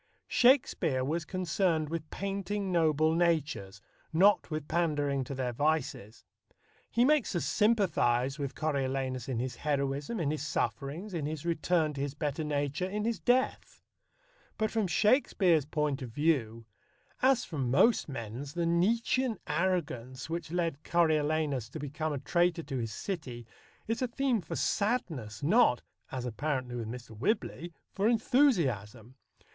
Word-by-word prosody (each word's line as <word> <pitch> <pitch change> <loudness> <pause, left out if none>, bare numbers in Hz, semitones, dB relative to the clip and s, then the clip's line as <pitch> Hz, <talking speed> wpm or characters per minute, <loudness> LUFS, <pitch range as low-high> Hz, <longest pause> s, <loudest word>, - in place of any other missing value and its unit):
Shakespeare 240 - +3
was 160 +3 -2
concerned 170 -3 0
with 160 -1 -4
painting 200 0 -3
noble 160 -2 +3
natures, 155 - 0 0.3
not 195 +6 +4
with 155 -2 -4
pandering 145 -5 0
to 140 - -5
their 125 -2 -2
vices. 145 -6 -1 0.6
He 240 +1 +3
makes 295 -8 +2
us 170 - 0
sympathize 155 - +2
with 140 -2 -4
Coriolanus 135 -4 -2
in 130 - -1
his 125 +1 -3
heroism, 140 +7 -1
in 150 -4 0
his 155 - -3
sufferings, 145 - -3
in 155 -4 -2
his 155 0 -5
return 165 -1 +1
to 140 - -5
his 140 0 -3
better 150 0 -2
nature, 145 +4 -1
in 210 +2 -2
his 230 -1 -1
death; 255 +1 0 0.7
but 220 0 0
from 220 -3 0
Shakespeare's 180 - +3
point 150 -2 -1
of 125 - -5
view, 115 -5 0 0.6
as 260 -1 +3
from 140 -7 -3
most 180 - +4
men's 125 +2 -6
the 170 -1 0
Nietzschean 225 +7 +1
arrogance 145 -9 -2
which 165 -2 -4
led 165 -4 -1
Coriolanus 155 -6 +1
to 145 - -7
become 150 +2 -3
a 145 - -2
traitor 170 +4 +1
to 135 -2 -4
his 115 -2 -3
city 125 - -5 0.4
is 225 +2 -2
a 255 - +1
theme 245 -2 0
for 160 - -6
sadness, 165 - -1
not 180 - +4 0.3
(as 125 -1 -4
apparently 130 +1 -2
with 115 -2 -4
Mr. 115 -1 -8
Whibley) 175 - -2 0.2
for 200 +2 +1
enthusiasm. 155 - +1
155 Hz, 145 wpm, -30 LUFS, 135-185 Hz, 0.7 s, not